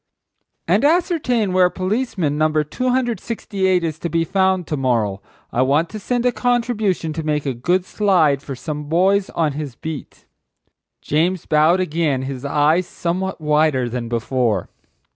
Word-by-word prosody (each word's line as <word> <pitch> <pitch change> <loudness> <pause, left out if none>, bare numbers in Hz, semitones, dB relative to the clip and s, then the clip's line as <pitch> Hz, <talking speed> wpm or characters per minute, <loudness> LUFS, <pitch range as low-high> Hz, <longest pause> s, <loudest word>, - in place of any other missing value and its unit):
"And - - +3
ascertain 290 - +1
where 185 -1 +4
policeman, 185 - -1
No. 155 0 +2
268, 230 - -1
is 160 -1 -3
to 170 - -3
be 165 0 +1
found 190 0 +1
to 150 - -2
morrow. 115 -8 0 0.3
I 120 - +2
want 145 +6 +2
to 215 - -7
send 245 +4 -1
a 250 - +4
contribution 230 -10 0
to 160 - -3
make 150 -2 -1
a 135 - -1
good 175 +10 0
slide 175 -10 +2
for 140 -2 -6
some 150 +3 -5
boys 190 +5 +2
on 160 -3 0
his 140 -3 -6
beat." 160 -2 -8 0.8
James 170 +4 0
bowed 155 +4 +3
again, 155 -6 0
his 130 -1 -5
eyes 150 +5 +2
somewhat 185 +2 -3
wider 150 -4 +2
than 120 -1 -4
before. 115 -4 -1
165 Hz, 150 wpm, -20 LUFS, 145-190 Hz, 0.8 s, where